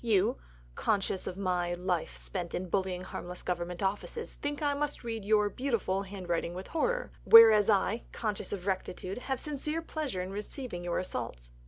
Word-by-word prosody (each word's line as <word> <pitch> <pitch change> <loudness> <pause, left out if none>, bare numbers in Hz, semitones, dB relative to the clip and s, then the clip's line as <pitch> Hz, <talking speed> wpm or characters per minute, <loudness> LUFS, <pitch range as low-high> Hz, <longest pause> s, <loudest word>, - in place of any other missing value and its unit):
You, 210 - +3 0.4
conscious 195 - 0
of 185 - -4
a 180 -2 0
life 180 -2 -2
spent 175 -3 -4
in 185 0 -3
bullying 185 -1 0
harmless 180 -1 -6
Government 175 0 -2
offices, 205 - -2
think 290 0 -3
that 290 -1 +2
I - - -4
must 295 -2 -2
read 225 -2 -4
your 210 0 +4
(beautiful) 220 -5 0
handwriting 180 -3 -3
with 185 +1 -5
horror. 485 +10 -1
Whereas 225 -2 +9
I, 215 +2 +2
conscious 215 -3 -3
of 190 -3 -4
rectitude, 190 +1 -2
have 265 0 -2
sincere 300 +2 -3
pleasure 290 - -3
in 185 - -6
receiving 210 -1 -5
your 175 -1 -1
assaults." - - -4
195 Hz, 170 wpm, -31 LUFS, 180-235 Hz, 0.4 s, Whereas